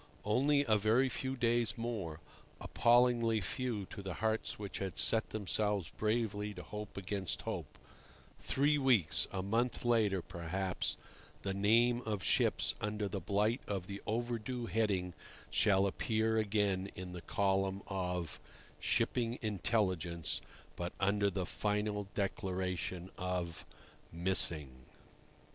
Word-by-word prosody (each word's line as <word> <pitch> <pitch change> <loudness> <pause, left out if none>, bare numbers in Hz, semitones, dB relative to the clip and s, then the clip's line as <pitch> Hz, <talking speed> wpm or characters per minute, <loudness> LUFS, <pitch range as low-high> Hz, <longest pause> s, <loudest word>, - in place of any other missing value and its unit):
Only 140 +7 +3
a 110 -1 +4
very 115 +6 +3
few 130 +2 -2
days 120 -1 +2
more—appallingly 115 +4 +1
few 105 +3 -2
to 100 - -6
the 95 -2 -5
hearts 110 0 -1
which 100 -2 -5
had 95 -5 -4
set 110 -1 +5
themselves 105 -3 -1
bravely 105 -2 -1
to 90 - -7
hope 105 -1 -7
against 100 -1 -3
hope—three 145 +2 -3
weeks, 120 - +3
a 95 -1 -3
month 115 +5 0
later, 105 -6 +2
perhaps, 90 +2 -2 0.5
the 95 - -1
name 115 +5 +3
of 105 -4 -3
ships - - +3
under 105 0 -1
the 100 0 -4
blight 105 - +1
of 95 -3 -2
the 100 +1 -7
"Overdue" 120 +2 -2
heading 100 -6 0 0.4
shall 100 -2 +4
appear 110 +3 0
again 100 -3 +1
in 90 0 -7
the 90 - -6
column 95 +3 0
of 90 -4 -3 0.4
"Shipping 120 0 +1
Intelligence," 95 -5 0 0.3
but 85 0 -4
under 100 +1 +2
the 95 -1 -2
final 105 +1 -1
declaration 95 -3 -2
of 90 -2 -3 0.4
"Missing." 80 -7 +2
105 Hz, 120 wpm, -34 LUFS, 95-115 Hz, 0.5 s, set